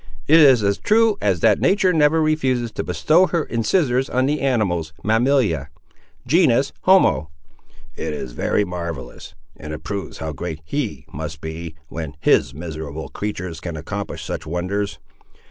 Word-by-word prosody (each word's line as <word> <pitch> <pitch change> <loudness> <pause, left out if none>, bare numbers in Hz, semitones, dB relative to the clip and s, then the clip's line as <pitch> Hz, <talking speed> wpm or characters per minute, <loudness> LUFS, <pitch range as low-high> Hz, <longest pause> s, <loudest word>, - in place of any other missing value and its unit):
"It 160 +3 +7
is 135 -7 +6
as 100 0 +1
true 220 0 +3
as 95 -5 +1
that - - +4
nature 190 -2 +3
never 160 0 +3
refuses 130 -7 0
to - - -4
bestow 175 +4 +3
her 170 -2 -1
incisores 125 - +1
on 130 +1 +2
the 145 +2 0
animals, 95 -12 0
mammalia; 110 - +2 0.6
genus, 140 -6 +3
homo—" 185 - +4 0.7
"It 80 - -4
is 75 -4 -5
very 105 +11 0
marvellous! 85 -2 -7 0.2
and 75 +1 -8
it 75 - -7
proves 100 -1 -5
how 80 -1 -4
great 80 +2 -6
He 135 - -3
must 75 +1 -6
be, 80 +1 -7
when 80 -3 -6
His - - +3
miserable 80 0 -6
creatur's 90 -5 -5
can 85 -2 -6
accomplish 80 - -5
such 80 - -5
wonders! 95 +5 -2
100 Hz, 150 wpm, -21 LUFS, -, 0.7 s, It